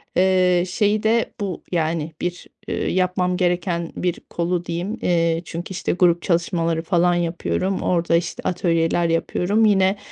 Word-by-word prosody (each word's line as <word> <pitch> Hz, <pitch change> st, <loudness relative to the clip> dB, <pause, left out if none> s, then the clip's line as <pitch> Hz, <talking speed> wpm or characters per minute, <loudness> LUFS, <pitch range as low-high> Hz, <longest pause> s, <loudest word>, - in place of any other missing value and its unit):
eee, 185 Hz, -1 st, +3 dB
şeyi 205 Hz, +3 st, +1 dB
de 225 Hz, +1 st, +1 dB
bu, 195 Hz, -4 st, -4 dB
yani, 160 Hz, -2 st, -1 dB
bir, 175 Hz, 0 st, -4 dB, 0.2 s
eee, -, -, -2 dB
yapmam 180 Hz, 0 st, +1 dB
gereken 175 Hz, -2 st, 0 dB
bir 180 Hz, -2 st, -2 dB
kolu 175 Hz, 0 st, -1 dB
diyeyim. 175 Hz, +7 st, -3 dB
Eee, 165 Hz, -1 st, +1 dB
çünkü, 170 Hz, +3 st, -6 dB
işte, 185 Hz, -, -2 dB
grup 175 Hz, -1 st, +3 dB
çalışmaları 170 Hz, -1 st, 0 dB
falan 175 Hz, +1 st, +2 dB
yapıyorum, 175 Hz, +2 st, -1 dB
orada, 170 Hz, -1 st, +1 dB
işte, 170 Hz, 0 st, -2 dB
atölyeler 170 Hz, -1 st, +1 dB
yapıyorum. 180 Hz, +6 st, +1 dB
Yine, 195 Hz, -1 st, +3 dB
175 Hz, 140 wpm, -22 LUFS, 170-185 Hz, 0.2 s, eee